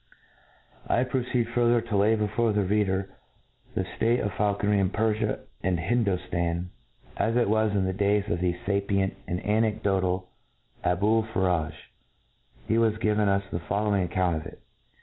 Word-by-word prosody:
I 120 Hz, -, +2 dB
proj:ced 125 Hz, -2 st, -1 dB
fur, 120 Hz, 0 st, +3 dB
thcr 115 Hz, -, -8 dB
to 105 Hz, -, 0 dB
lay 105 Hz, +3 st, +4 dB
before 110 Hz, +1 st, 0 dB
the 105 Hz, -1 st, +2 dB
reader 95 Hz, -1 st, 0 dB, 0.6 s
the -, -, +1 dB
ftate 120 Hz, +2 st, 0 dB
of 105 Hz, -, -1 dB
faulconry 105 Hz, 0 st, +1 dB
in 95 Hz, -2 st, +2 dB
Perfia 110 Hz, 0 st, 0 dB, 0.2 s
and 95 Hz, -1 st, +1 dB
Hindoftan, 90 Hz, -3 st, -1 dB, 0.5 s
as 115 Hz, -, +1 dB
it 120 Hz, -3 st, +3 dB
was 110 Hz, 0 st, +2 dB
in 95 Hz, -2 st, +2 dB
the 95 Hz, -, -1 dB
days 100 Hz, +1 st, +1 dB
of 85 Hz, -, -1 dB
the 90 Hz, -1 st, +1 dB
fapicnt 100 Hz, -1 st, 0 dB
and 90 Hz, +1 st, -3 dB
anecdotical 100 Hz, -4 st, +1 dB, 0.6 s
Abul^farage, 95 Hz, -4 st, +1 dB, 0.9 s
who 115 Hz, +1 st, +2 dB
has 110 Hz, -1 st, +2 dB
given 105 Hz, -2 st, +1 dB
us 100 Hz, 0 st, +2 dB
the 85 Hz, -, -2 dB
following 100 Hz, +3 st, 0 dB
;account 90 Hz, -1 st, 0 dB
of 80 Hz, +1 st, -6 dB
it. -, -, -13 dB
100 Hz, 150 wpm, -27 LUFS, 95-110 Hz, 0.9 s, lay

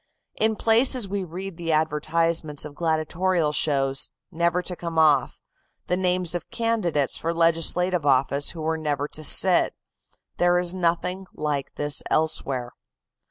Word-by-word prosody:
In 220 Hz, 0 st, +1 dB
places 230 Hz, +1 st, +3 dB
we 195 Hz, 0 st, -3 dB
read 180 Hz, +1 st, -7 dB
the 170 Hz, -2 st, -3 dB
advertisements 155 Hz, 0 st, 0 dB
of 150 Hz, -, -8 dB
gladiatorial 165 Hz, +1 st, 0 dB
shows, 135 Hz, -3 st, 0 dB, 0.2 s
never 170 Hz, +1 st, 0 dB
to 180 Hz, -, -3 dB
come 170 Hz, -1 st, -6 dB
off, 150 Hz, -5 st, +3 dB, 0.5 s
the 180 Hz, -, 0 dB
names 180 Hz, -2 st, 0 dB
of 175 Hz, -, -5 dB
candidates 200 Hz, -, 0 dB
for 165 Hz, -, -2 dB
legislative 170 Hz, +1 st, +2 dB
office 140 Hz, +1 st, +2 dB
who 165 Hz, -, -7 dB
were 160 Hz, 0 st, -1 dB
never 145 Hz, -2 st, -2 dB
to 155 Hz, -, -8 dB
sit. 180 Hz, +3 st, +4 dB, 0.6 s
There 175 Hz, 0 st, +3 dB
is 180 Hz, 0 st, 0 dB
nothing 180 Hz, +1 st, -1 dB
like 145 Hz, -3 st, -3 dB
this 145 Hz, 0 st, -2 dB
elsewhere. 135 Hz, -6 st, 0 dB
165 Hz, 140 wpm, -24 LUFS, 150-180 Hz, 0.6 s, sit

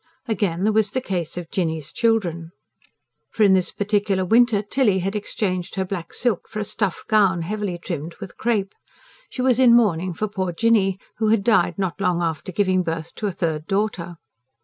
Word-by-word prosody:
Again, 190 Hz, -5 st, -1 dB
there 215 Hz, +1 st, +2 dB
was 215 Hz, -1 st, +3 dB
the 260 Hz, -, -1 dB
case 175 Hz, -8 st, -3 dB
of 175 Hz, -2 st, -6 dB
Jinny's 160 Hz, -4 st, -2 dB
children. 180 Hz, -7 st, 0 dB, 0.8 s
For 220 Hz, -, +1 dB
in 200 Hz, -2 st, +6 dB
this 185 Hz, -1 st, +2 dB
particular 205 Hz, -2 st, 0 dB
winter 225 Hz, 0 st, +4 dB
Tilly 210 Hz, -2 st, +2 dB
had 195 Hz, +3 st, -2 dB
exchanged 185 Hz, -3 st, -2 dB
her 190 Hz, -1 st, -1 dB
black 180 Hz, -3 st, -5 dB
silk 240 Hz, -7 st, -1 dB
for -, -, -7 dB
a 215 Hz, -, -1 dB
stuff 205 Hz, -2 st, -2 dB
gown, 195 Hz, -5 st, +3 dB
heavily 205 Hz, 0 st, -3 dB
trimmed 165 Hz, -1 st, -5 dB
with 185 Hz, -, -10 dB
crepe. 210 Hz, -4 st, -1 dB, 0.6 s
She 255 Hz, -, -4 dB
was 255 Hz, -1 st, +3 dB
in 245 Hz, -2 st, +7 dB
mourning 185 Hz, -6 st, +2 dB
for 215 Hz, -, -1 dB
poor 190 Hz, -3 st, -3 dB
Jinny, 200 Hz, -1 st, +2 dB, 0.2 s
who 220 Hz, 0 st, 0 dB
had 215 Hz, -2 st, +3 dB
died 220 Hz, -1 st, +3 dB
not 190 Hz, -1 st, -2 dB
long 175 Hz, -3 st, +1 dB
after 165 Hz, +2 st, -3 dB
giving 185 Hz, 0 st, +2 dB
birth 165 Hz, -2 st, -4 dB
to 215 Hz, -, -3 dB
a -, -, -1 dB
third 160 Hz, -3 st, -2 dB
daughter. 195 Hz, -4 st, -1 dB
195 Hz, 190 wpm, -22 LUFS, 175-215 Hz, 0.8 s, in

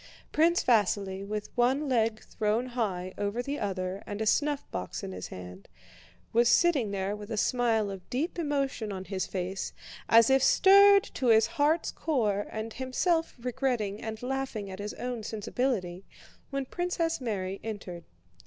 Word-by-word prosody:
Prince 335 Hz, +3 st, +3 dB
Vasíli, 200 Hz, -4 st, +1 dB
with 210 Hz, +1 st, -5 dB
one 260 Hz, +5 st, +2 dB
leg 225 Hz, -4 st, +1 dB
thrown 220 Hz, +3 st, -1 dB
high 190 Hz, -7 st, -2 dB
over 205 Hz, +4 st, -1 dB
the 285 Hz, +3 st, -3 dB
other 190 Hz, -1 st, -3 dB
and 205 Hz, 0 st, -5 dB
a 220 Hz, -, -1 dB
snuffbox 275 Hz, -, -1 dB
in -, -, -5 dB
his 90 Hz, 0 st, -6 dB
hand, 90 Hz, +1 st, -10 dB, 0.7 s
was 235 Hz, +1 st, +4 dB
sitting 280 Hz, -5 st, +3 dB
there 200 Hz, 0 st, -2 dB
with 210 Hz, -1 st, -9 dB
a 220 Hz, -, -3 dB
smile 225 Hz, -3 st, +1 dB
of 190 Hz, -2 st, -9 dB
deep 305 Hz, +8 st, -2 dB
emotion 275 Hz, -8 st, -1 dB
on 190 Hz, -1 st, -5 dB
his 190 Hz, -1 st, -3 dB
face, 190 Hz, 0 st, -4 dB, 0.4 s
as 230 Hz, +2 st, +6 dB
if 270 Hz, 0 st, +5 dB
stirred 400 Hz, +5 st, +7 dB
to 255 Hz, -, -3 dB
his 220 Hz, -1 st, +6 dB
heart's 300 Hz, +7 st, +1 dB
core 215 Hz, -10 st, 0 dB
and 220 Hz, +1 st, -5 dB
himself 325 Hz, +6 st, 0 dB
regretting 240 Hz, -4 st, -1 dB
and 220 Hz, +1 st, -6 dB
laughing 250 Hz, -6 st, -3 dB
at 190 Hz, -, -8 dB
his 205 Hz, +1 st, -5 dB
own 245 Hz, -1 st, -4 dB
sensibility, 210 Hz, -4 st, -2 dB, 0.5 s
when 275 Hz, -1 st, -2 dB
Princess 335 Hz, 0 st, -1 dB
Mary 195 Hz, -5 st, -3 dB
entered. 195 Hz, -6 st, -6 dB
225 Hz, 155 wpm, -29 LUFS, 200-270 Hz, 0.7 s, stirred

